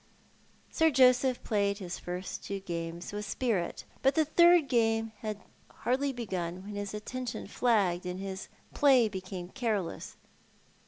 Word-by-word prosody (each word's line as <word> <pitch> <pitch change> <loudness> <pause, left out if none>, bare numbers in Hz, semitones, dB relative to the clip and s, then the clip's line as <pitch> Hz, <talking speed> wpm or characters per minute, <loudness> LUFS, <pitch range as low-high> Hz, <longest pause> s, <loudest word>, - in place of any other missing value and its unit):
Sir 320 0 +4
Joseph 255 -2 +4
played 200 -2 +1
his 180 -4 -6
first 180 +1 -5
two 200 0 -4
games 170 0 -5
with 210 0 -3
spirit, 210 -5 -2 0.2
but 270 +1 +3
the 315 -1 +4
third 340 0 +5
game 225 -3 +2
had 215 -2 -4 0.3
hardly 270 +3 -1
begun 185 -7 -4
when 205 +1 -8
his 205 0 -4
attention 245 +3 -5
flagged 195 -7 +1
and 180 +1 -4
his 190 0 -5 0.3
play 265 -6 +5
became 185 -3 -6
careless. 215 -7 -3
210 Hz, 140 wpm, -30 LUFS, 185-250 Hz, 0.3 s, third